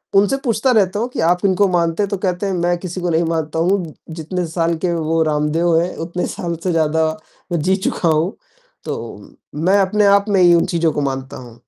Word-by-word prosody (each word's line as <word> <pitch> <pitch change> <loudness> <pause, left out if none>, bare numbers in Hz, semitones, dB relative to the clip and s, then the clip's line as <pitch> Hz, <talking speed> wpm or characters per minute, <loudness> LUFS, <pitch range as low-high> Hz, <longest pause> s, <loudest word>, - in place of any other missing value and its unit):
उनसे 205 +7 +4
पूछता 235 +2 +1
रहता 205 -3 +2
हूँ 235 - -1
कि, - - -6
"आप 180 +4 +2
इनको 195 +1 +3
मानते 170 +2 +1
हैं?" 200 - -2
तो 200 - -2
कहते 185 +1 -2
हैं, 195 - -1
"मैं 175 0 0
किसी 180 0 -6
को 175 - -1
नहीं 165 +1 +2
मानता 160 -1 -2
हूँ, 175 -2 0 0.2
जितने 170 +3 -4
साल 165 0 0
के 175 - +1
वो 165 0 0
रामदेव 155 +2 +1
हैं, 175 - -3
उतने 170 +2 -3
साल 175 -5 -3
से 185 - 0
ज़्यादा 160 0 +1 0.5
मैं 170 - 0
जी 190 +4 +2
चुका 170 - 0
हूँ, 160 +5 +1 0.5
तो - - -3 0.7
मैं 190 +3 +4
अपने 205 +2 +2
आप 200 0 +4
में 195 -2 +3
ही 175 -1 +6
उन 165 - +3
चीज़ों 165 -1 +2
को 145 - -1
मानता 130 0 -7
हूँ।" 120 -2 -12
175 Hz, 220 wpm, -18 LUFS, 160-190 Hz, 0.7 s, ही